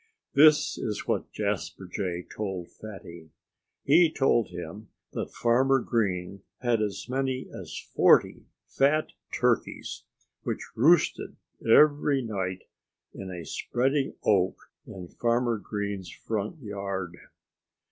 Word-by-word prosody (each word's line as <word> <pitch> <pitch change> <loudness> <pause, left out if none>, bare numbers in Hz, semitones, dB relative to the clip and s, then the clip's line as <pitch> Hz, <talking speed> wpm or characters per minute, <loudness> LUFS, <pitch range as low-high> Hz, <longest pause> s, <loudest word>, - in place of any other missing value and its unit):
This 150 +1 +5
is 105 -2 -3
what - - -1
Jasper 95 - -3
Jay 90 -1 -3
told 95 -5 -4
Fatty: 85 -6 -11 0.5
he 160 +3 +5
told 135 -7 +2
him 90 +4 -8 0.2
that - - -4
Farmer 130 +3 +3
Green 100 -5 -1 0.2
had 120 -3 +2
as 105 -1 -3
many 130 0 -2
as - - -7
forty - - +3 0.2
fat 150 +3 +2 0.2
turkeys, - - -1 0.4
which - - -4
roosted 160 +9 +3 0.3
every 145 +2 +5
night 95 -4 -3 0.5
in 95 - -7
a 90 -3 -7
spreading 135 +3 -1
oak 95 -3 +1 0.2
in 90 -2 -8
Farmer 120 +2 0
Green's 100 -3 -4
front 110 - -4
yard. 100 -4 -4
110 Hz, 110 wpm, -27 LUFS, 95-130 Hz, 0.5 s, This